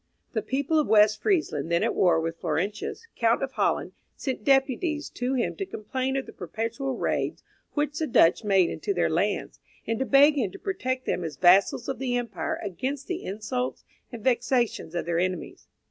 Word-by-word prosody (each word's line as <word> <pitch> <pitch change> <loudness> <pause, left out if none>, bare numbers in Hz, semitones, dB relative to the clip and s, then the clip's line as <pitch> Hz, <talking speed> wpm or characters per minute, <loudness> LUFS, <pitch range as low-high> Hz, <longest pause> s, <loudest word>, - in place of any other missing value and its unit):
The 220 - -1
people 285 +8 0
of 300 - +1
West 215 0 +5
Friesland, 170 - 0
then 170 - +2
at - - +1
war 175 -3 +3
with 165 +1 -3
Florentius, 215 - -2
Count 230 +2 +2
of 270 - -2
Holland, - - 0 0.2
sent 260 -6 -4
deputies 275 +4 +1
to 250 +2 -2
him 245 - -1
to 395 - -2
complain 260 - -2
of 270 - -2
the - - -11
perpetual 230 - -4
raids - - -1 0.3
which 295 0 -1
the 315 - 0
Dutch 170 - +4
made 195 -4 +3
into 400 - -3
their - - +1
lands, - - -1 0.3
and 225 -1 -1
to 265 - 0
beg 285 +1 +6
him 220 -7 0
to - - -8
protect 255 -10 -3
them 180 - -1
as 155 -4 -5
vassals 190 - +4
of 265 -3 -3
the 255 -2 -1
empire 210 -9 -3
against 255 - -3
the 360 0 -4
insults 220 +6 -3 0.3
and 235 -4 -8
vexations 240 -8 0
of 170 - -2
their 170 0 0
enemies. 185 -1 -3
245 Hz, 190 wpm, -26 LUFS, 195-270 Hz, 0.3 s, beg